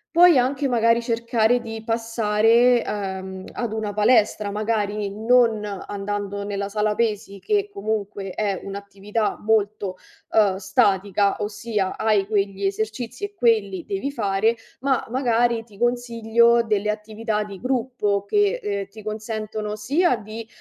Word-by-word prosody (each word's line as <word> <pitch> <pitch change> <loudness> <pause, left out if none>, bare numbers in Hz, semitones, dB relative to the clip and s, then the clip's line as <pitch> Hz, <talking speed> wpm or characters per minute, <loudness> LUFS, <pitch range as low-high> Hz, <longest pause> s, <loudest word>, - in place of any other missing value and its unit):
puoi 345 -3 +7
anche, 265 +2 +1
magari, 230 -1 +3
cercare 235 0 +1
di 225 -2 -7
passare, 225 +1 +3
uhm, 190 -2 -4
ad 235 -3 -3
una 220 -2 -2
palestra, 210 -1 +3
magari 210 -1 -1
non 225 0 +3 0.3
andando 200 0 -4
nella 200 -1 -3
sala 210 0 0
pesi, 210 -3 -2
che 410 - 0
comunque 215 - -3
è 200 -1 -1
un'attività 200 +2 -3
molto, 210 -3 0 0.3
uhm, 205 -4 +4
statica, 195 +1 +1
ossia 205 -1 -2
hai 215 -3 +2
quegli 200 -2 -1
esercizi 220 - -3
e 405 - -9
quelli 215 - +1
devi 200 +8 -3
fare, 220 -3 +1 0.2
ma 270 0 0
magari 235 -2 +1
ti 210 -4 -18
consiglio 235 0 +2
delle 210 -2 0
attività 215 0 -3
di 200 -2 -9
gruppo 245 -5 -1
che, 410 - +1
ehm, 200 -1 -2
ti 210 +2 -13
consentono 215 0 -4
sia 280 - +2
di, 220 +1 -8
215 Hz, 130 wpm, -23 LUFS, 200-235 Hz, 0.3 s, puoi